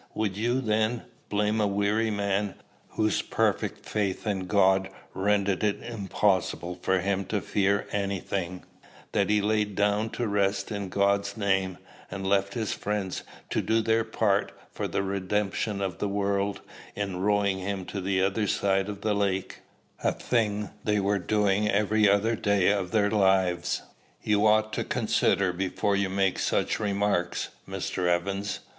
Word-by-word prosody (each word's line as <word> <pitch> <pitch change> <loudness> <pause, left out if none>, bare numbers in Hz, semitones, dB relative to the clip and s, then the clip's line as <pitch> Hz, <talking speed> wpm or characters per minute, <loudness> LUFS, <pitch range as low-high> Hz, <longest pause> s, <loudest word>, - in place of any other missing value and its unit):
Would 105 -3 -1
you, 120 +5 0
then, 110 0 0 0.3
blame 105 +1 +1
a 105 - +3
weary 100 +3 +1
man, 100 -1 -1 0.4
whose 110 -2 +2
perfect - - -1
faith 100 -2 -2
in 95 -3 -1
God 95 0 +3 0.2
rendered 100 0 +1
it 105 -1 +1
impossible 95 -5 -1
for 95 -1 +1
him 100 +1 0
to 105 - -1
fear 100 +1 +1
any 100 -1 -1
thing, 90 -1 -4 0.5
that - - +1
he 105 0 +3
lay 105 0 +2
down 105 +1 0
to 120 - 0
rest 100 0 0
in 100 -2 -3
God's 100 +1 +1
name, 95 -3 0 0.3
and 95 0 -5
left 100 0 +1
his 110 -4 -1
friends 100 -3 -3 0.3
to - - +1
do 110 0 +2
their 115 0 +2
part 110 -2 +1 0.2
for - - -3
the 100 - -1
redemption 100 +1 -1
of 95 -4 -3
the 105 - -1
world 100 0 -1 0.3
in 100 -3 -3
rowing 100 0 +1
him 95 -1 -3
to 100 - -5
the 95 0 +1
other 100 +2 +1
side 95 0 +1
of 100 -1 -6
the 105 0 +1
lake, 100 -2 -1 0.4
a - - +3
thing 105 -4 -1
they 105 -1 +1
were 100 +1 +1
doing 105 +1 +1
every 105 +1 +3
other 105 +3 +3
day 100 -3 +2
of 100 -3 -1
their 105 0 +2
lives? 95 -4 +2 0.4
You 105 0 +3
ought 110 0 +3
to - - -1
consider 95 -2 +1
before 95 +3 0
you 100 -1 +1
make 95 0 +1
such - - 0
remarks, 100 -4 0 0.2
Mr. 90 -1 -2
Evans. 100 +4 -1
100 Hz, 160 wpm, -27 LUFS, 95-105 Hz, 0.5 s, a